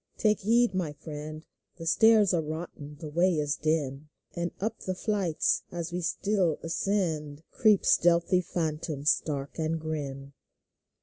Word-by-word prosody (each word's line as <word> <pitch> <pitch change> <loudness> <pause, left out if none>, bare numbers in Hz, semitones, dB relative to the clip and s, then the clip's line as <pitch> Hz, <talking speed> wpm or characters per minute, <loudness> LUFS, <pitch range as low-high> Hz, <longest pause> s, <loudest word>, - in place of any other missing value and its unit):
Take 215 -2 +2
heed, 230 +1 +3
my 175 -5 -2
friend, 155 +1 -8 0.3
The 165 - -8
stairs 215 +2 +5
are 170 - +2
rotten, 155 -2 -7
the 155 -3 -7
way 175 +3 +3
is 145 -1 0
dim; 150 -2 -1 0.3
And 170 0 -1
up 220 +2 -2
the 185 - -3
flights, 195 -5 0
as 170 -1 -4
we 180 - -2
still 185 -1 0
ascend. 165 -4 -1
Creep 215 -5 +3
stealthy 170 +1 +4
phantoms 155 -3 0
dark 140 0 -5
and 160 +1 0
grim. 140 -3 -5
165 Hz, 140 wpm, -28 LUFS, 150-185 Hz, 0.3 s, stairs